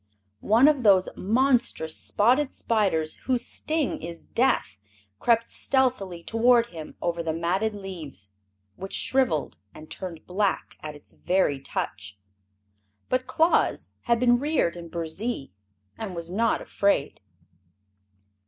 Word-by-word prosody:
One 230 +6 +6
of 295 -3 +3
those 195 -5 +5
monstrous 230 -7 +1
spotted 255 +7 +2
spiders 190 -9 0
whose 250 -1 0
sting 310 -3 -2
is 170 0 -7
death 245 - 0 0.4
crept 230 -1 +2
stealthily 240 -10 0
toward 235 +2 +4
him 160 -2 -8
over 170 -1 -1
the 165 -1 -2
matted 185 +6 0
leaves, 160 - -7 0.5
which 195 +1 -7
shriveled 255 - 0 0.2
and 155 0 -12
turned 175 -4 -7
black 195 +2 -1
at 150 -1 -7
its 145 - -15
very 180 -6 +1
touch. 100 -6 -5 0.9
But 255 0 0
Claus 320 +6 +1
had 235 -1 +2
been 240 0 +4
reared 285 - 0
in 170 -1 -9
Burzee, 170 - -3 0.5
and 200 -5 -5
was 170 0 -3
not 225 +4 +1
afraid. 200 -8 0
200 Hz, 125 wpm, -26 LUFS, 170-245 Hz, 0.9 s, One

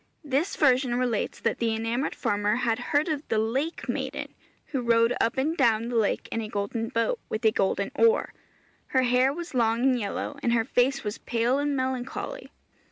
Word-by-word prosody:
This 290 +6 0
version 255 -3 +3
relates 245 -4 -1
that - - 0
the 230 -1 +1
enamoured 230 +4 -2
farmer 205 +1 0
had 235 -1 0
heard 290 +3 +2
of 305 -3 -1
the 220 - 0
lake 260 +9 -1
maiden, - - -4 0.4
who 275 -4 -1
rowed 230 0 +3
up 230 - +1
and 300 +5 +1
down 230 -5 +2
the 245 - -3
lake 220 -3 +1
in 230 - -1
a 215 - -4
golden 220 +3 -2
boat, 250 - 0
with 220 +1 -3
a 220 - +6
golden 195 0 0
oar. 460 +1 +3 0.5
Her 260 -1 +2
hair 250 +2 +3
was 340 +2 -7
long 230 -2 +2
and 260 -2 +3
yellow, 230 +6 -4
and 235 - +1
her 225 -1 +2
face 265 +4 +1
was 210 0 -4
pale 240 +3 0
and 290 0 0
melancholy. 260 - -3
245 Hz, 190 wpm, -26 LUFS, 225-275 Hz, 0.5 s, a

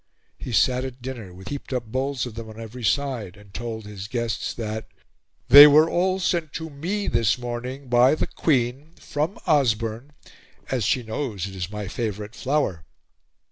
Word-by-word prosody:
He 125 - -6
sat 125 +6 +3
at 130 -1 -7
dinner 120 -7 -6
with 95 +3 -10
heaped 140 -1 -6
up 125 -2 -2
bowls 130 +3 -2
of 120 - -7
them 115 0 -7
on 110 +1 -11
every 115 +2 -8
side, 115 -5 -1
and 100 -1 -17
told 110 -1 -5
his 100 -1 -7
guests 115 0 -2
that 110 -1 -4 0.6
"they 145 +4 +12
were 155 +2 +6
all 185 +2 +1
sent 170 -5 -1
to 160 0 -5
me 180 +9 -3
this 115 0 +2
morning 125 +3 -5
by 125 +4 +5
the - - -1
Queen 135 +2 0
from 155 +6 -3
Osborne, 120 -2 +1 0.6
as 125 -6 0
she 125 +3 +1
knows 110 -4 -3
it 95 -1 -8
is 90 -2 -4
my 105 -1 -5
favorite 105 -1 -4
flower." 130 - -1
120 Hz, 175 wpm, -24 LUFS, 110-140 Hz, 0.6 s, they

